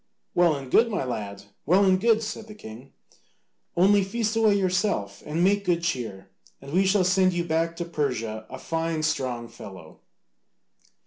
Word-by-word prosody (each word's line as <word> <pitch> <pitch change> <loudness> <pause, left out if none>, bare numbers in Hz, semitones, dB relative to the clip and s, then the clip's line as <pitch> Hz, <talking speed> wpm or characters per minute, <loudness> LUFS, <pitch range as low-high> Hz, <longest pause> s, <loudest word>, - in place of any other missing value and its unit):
"Well 175 -3 +4
and 135 -2 -8
good, 230 +1 +5
my 205 -9 -1
lad, 100 -5 -5 0.2
well 185 +6 +4
and 185 -1 +3
good," 225 0 +3
said 215 0 -6
the 215 - -11
king, 120 - -11 0.9
"only 200 +3 +5
feast 220 +2 -2
away 220 -2 +4
yourself 185 - -1
and 160 +3 0
make 200 +2 +3
good 170 -3 0
cheer, 110 - -4 0.3
and 140 +1 -10
we 190 +2 +3
shall 190 0 +3
send 185 0 +3
you 175 0 -1
back 165 0 -1
to 170 - -4
Persia 120 -9 -3
a 130 - -7
fine 165 +2 -2
strong 125 -6 -1
fellow." 95 -8 -12
170 Hz, 170 wpm, -25 LUFS, 125-195 Hz, 0.9 s, good